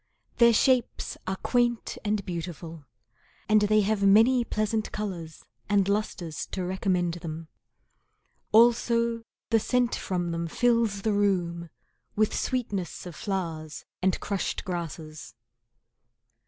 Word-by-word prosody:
Their 235 -1 +7
shapes 250 +1 +1
are 190 - -1
quaint 240 +2 0
and 210 -1 -1
beautiful, 165 -3 -6 0.6
And 215 0 +5
they 215 +1 +4
have 210 0 0
many 225 +6 +5
pleasant 215 -1 -1
colours 175 -7 -6 0.2
and 200 -2 +3
lustres 200 -6 -2
To 185 - -4
recommend 180 -2 0
them. 160 0 -6 1.0
Also 230 0 +4 0.3
the 225 - +5
scent 245 +2 +1
from 175 -2 -2
them 170 0 -2
fills 230 0 +1
the 220 - +1
room 175 -4 0 0.5
With 215 0 +1
sweetness 205 -11 -2
of 175 -3 -8
flowers 165 -6 -4 0.2
and 185 0 +1
crushed 200 +1 -3
grasses. 165 - -6
200 Hz, 115 wpm, -27 LUFS, 170-220 Hz, 1.0 s, Their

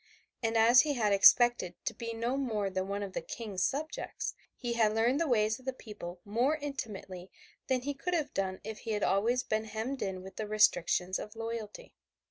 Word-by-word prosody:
And 225 -1 +1
as 235 +3 +7
he 300 -2 0
had 215 -4 +2
expected 220 -2 +6
to 230 - -1
be 230 +1 -5
no 230 +3 -1
more 220 -8 -1
than 190 0 -2
one 200 +1 -2
of 195 -2 -6
the - - -2
King's 205 -5 -5
subjects, 305 +3 -3 0.2
he 240 -2 -3
had 220 -2 +2
learned 240 +5 +2
the 335 - +1
ways 220 -3 +2
of 255 - -18
the 265 - -1
people 205 -8 -9
more 240 +9 +1
intimately 205 - -6 0.4
than 260 -2 +1
he 285 +2 -2
could 355 +6 -2
have 310 -4 -1
done 190 -1 -2
if 220 +1 -6
he 225 - -3
had 210 - -1
always 235 +6 +2
been 215 0 -1
hemmed 225 +5 -4
in 190 -2 -3
with 190 - -11
the 215 - -3
restrictions 185 -3 +2
of 210 +1 -8
royalty. 225 -2 -6
220 Hz, 205 wpm, -31 LUFS, 200-245 Hz, 0.4 s, as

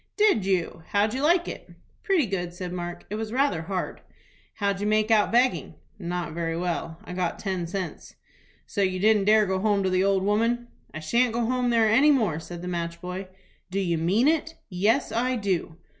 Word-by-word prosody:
"Did 415 - +3
you? 180 -4 0
How'd 205 +2 +1
you 260 - -2
like 345 +4 +3
it?" - - -7 0.3
"Pretty 385 - +2
good," 180 -4 -3
said 180 -1 -5
Mark. 175 -1 -5
"It 210 - -2
was 220 -1 -4
rather 260 - +1
hard." 185 +2 -4 0.5
"How'd 200 -1 -1
you 205 - 0
make 215 +1 +2
out 215 -2 +4
begging?" 250 +2 +2 0.2
"Not 175 -3 -3
very 165 0 -2
well. 170 -2 -3
I - - -8
got 180 -2 -1
ten 185 -4 -3
cents." 190 +1 -6 0.5
"So 205 - -3
you 185 -1 +1
didn't 210 0 +4
dare 215 +1 +6
to - - +2
go 190 - 0
home 205 -1 +2
to 190 - 0
the 185 0 +2
old 195 -1 +2
woman?" 230 +4 +1 0.2
"I 155 - -7
shan't 235 +9 +2
go 240 - +1
home 250 +1 0
there 230 -2 +4
any 260 +8 +5
more," 215 - +2
said 170 +1 -8
the - - -5
match 170 -1 -3
boy. 180 +2 -6 0.4
"Do 195 +2 -2
you 170 -4 0
mean 195 - +2
it?" 325 +1 +1 0.2
"Yes, 210 +9 +1
I 250 +2 0
do." 190 -7 -2
200 Hz, 205 wpm, -26 LUFS, 180-230 Hz, 0.5 s, dare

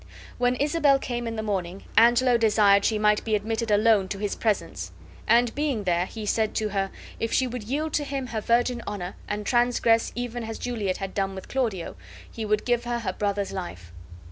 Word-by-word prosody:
When 245 0 +2
Isabel 290 0 +3
came 240 -3 -4
in 225 - -3
the 220 - -3
morning 190 -3 -3
Angelo 240 +2 +5
desired 210 -3 +4
she 220 - +2
might 210 0 +2
be 220 -1 +1
admitted 225 +2 -2
alone 210 -1 +4
to 195 - -4
his 205 0 -2
presence; 215 -3 -2 0.4
and 235 +1 +4
being 285 -7 -1
there, 175 -1 +1
he 220 0 -7
said 220 +1 0
to 215 -1 0
her, 195 -1 -1 0.3
if 225 - -2
she 260 - +2
would 250 -1 -4
yield 295 +6 -2
to 295 - +1
him 275 -2 -3
her 230 -3 -4
virgin 240 +2 +1
honor 195 -3 -5
and 210 0 -3
transgress 240 -1 +2
even 245 0 -4
as 225 0 -5
Juliet 215 -7 -2
had 195 -1 -5
done 195 -1 -1
with 190 - -8
Claudio, 225 -10 -2 0.4
he 225 - -5
would 210 0 0
give 240 -1 +1
her 240 0 -1
her 185 -4 -2
brother's 200 0 -1
life. 90 - -7
220 Hz, 200 wpm, -26 LUFS, 200-240 Hz, 0.4 s, Angelo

